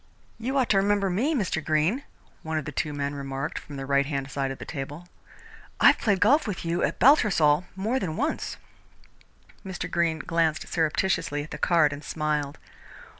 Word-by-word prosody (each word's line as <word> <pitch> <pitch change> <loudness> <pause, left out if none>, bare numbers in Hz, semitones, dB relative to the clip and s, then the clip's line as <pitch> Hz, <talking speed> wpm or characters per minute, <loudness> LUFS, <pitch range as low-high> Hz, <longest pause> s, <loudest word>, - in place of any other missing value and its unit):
"You 260 +4 -2
ought 260 -3 +2
to 200 - +4
remember 200 -1 +2
me, 260 - +1
Mr. 185 - -1
Greene," 155 - +1 0.4
one 160 0 -3
of 155 - -3
the 150 - -5
two 150 - -2
men 145 0 -3
remarked 140 0 -4
from 145 - -11
the 135 -1 -5
right 140 0 +2
hand 135 -2 -3
side 135 -1 -1
of 135 - -5
the - - -8
table. 145 +4 -6 0.7
"I've - - +6
played 200 -4 +1
golf 275 +9 +4
with 190 -4 -4
you 170 +1 0
at - - 0
Baltusrol 180 - +4
more 220 +7 -1
than 165 -6 -3
once." 295 +7 -2 1.1
Mr. 185 -2 -5
Greene 170 -2 +1
glanced 160 -1 0
surreptitiously 160 -2 0
at 150 - -12
the - - -6
card 160 -4 +3
and 145 +1 -8
smiled. 150 -2 -2
160 Hz, 180 wpm, -26 LUFS, 145-195 Hz, 1.1 s, I've